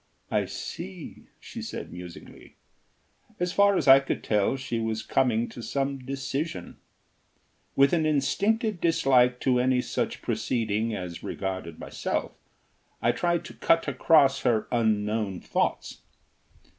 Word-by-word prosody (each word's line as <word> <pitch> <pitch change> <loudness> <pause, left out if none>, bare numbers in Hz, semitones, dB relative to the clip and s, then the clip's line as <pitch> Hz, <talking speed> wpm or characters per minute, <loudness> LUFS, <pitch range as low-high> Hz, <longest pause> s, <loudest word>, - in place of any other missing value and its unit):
"I - - +1
see," 180 0 -8
she - - -8
said, - - -6
musingly. 90 -1 -11 0.8
As 180 0 -1
far 200 -1 +4
as - - -1
I 135 0 +10
could 135 - -3
tell 105 +3 +1
she 125 -3 -3
was 110 -1 -2
coming 120 -3 +1
to 120 - -9
some 135 +2 -2
decision. 135 +4 -4 1.0
With 140 +3 +4
an 160 -2 +2
instinctive 200 - +1
dislike 125 -7 +3
to 125 -2 +2
any 125 0 +2
such - - -3
proceeding 110 -2 -1
as 90 -3 -6
regarded 95 -4 -5
myself, - - -3 0.7
I - - +2
tried 175 -1 0
to - - -9
cut 165 - +2
across 140 -4 +4
her 115 -4 +1
unknown 105 -4 0
thoughts. - - -2
130 Hz, 130 wpm, -27 LUFS, 110-155 Hz, 1.0 s, I